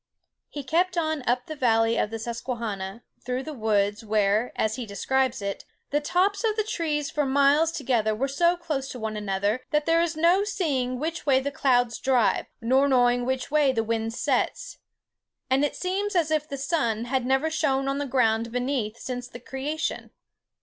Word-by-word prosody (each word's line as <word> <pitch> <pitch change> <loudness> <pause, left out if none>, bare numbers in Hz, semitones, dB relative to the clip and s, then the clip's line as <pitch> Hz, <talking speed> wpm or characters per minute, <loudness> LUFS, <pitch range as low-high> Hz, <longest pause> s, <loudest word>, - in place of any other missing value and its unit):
He 290 - -6
kept 350 +6 +1
on 315 -3 0
up 250 +1 +1
the 310 - -6
valley 225 -4 +2
of 210 - 0
the 225 - -4
Susquehanna, 230 -3 -5 0.2
through 250 +1 -2
woods, 215 -7 0
where, 215 +1 +1
as 220 0 0
he 245 -3 -5
describes 260 +3 0
it, 200 0 -4 0.3
"the 295 +1 +1
tops 370 +8 +1
of 435 -2 +1
the 430 - +1
trees 310 -8 -2
for 300 - 0
miles 285 +4 +3
together 235 -8 0
were 265 +5 -1
so 340 +6 +2
close 300 -6 -3
to 250 - -7
one 220 -1 -3
another 205 +3 -1
that 300 0 +1
there 330 0 +3
is 335 -2 -1
no 345 +5 +4
seeing 290 -12 -1
which 320 +2 -4
way 265 -2 +5
the 280 +2 -3
clouds 245 -5 +1
drive, 255 -4 +2
nor 260 +4 +3
knowing 245 -2 +3
which 260 0 -2
way 295 -3 +4
the 225 -3 0
wind 225 0 -2
sets; - - -1 0.7
and 270 +2 +3
it 290 - 0
seems 385 +2 -2
as 325 -3 +2
if 305 -1 0
the 275 - -4
sun 265 -6 -1
had 260 +1 0
never 265 +5 +1
shone 270 -3 0
on 275 +1 -1
the 285 - -2
ground 230 -3 +1
beneath 245 -3 -2
since 250 0 -5
the 240 - -10
creation." 280 +6 -4
265 Hz, 185 wpm, -26 LUFS, 230-305 Hz, 0.7 s, way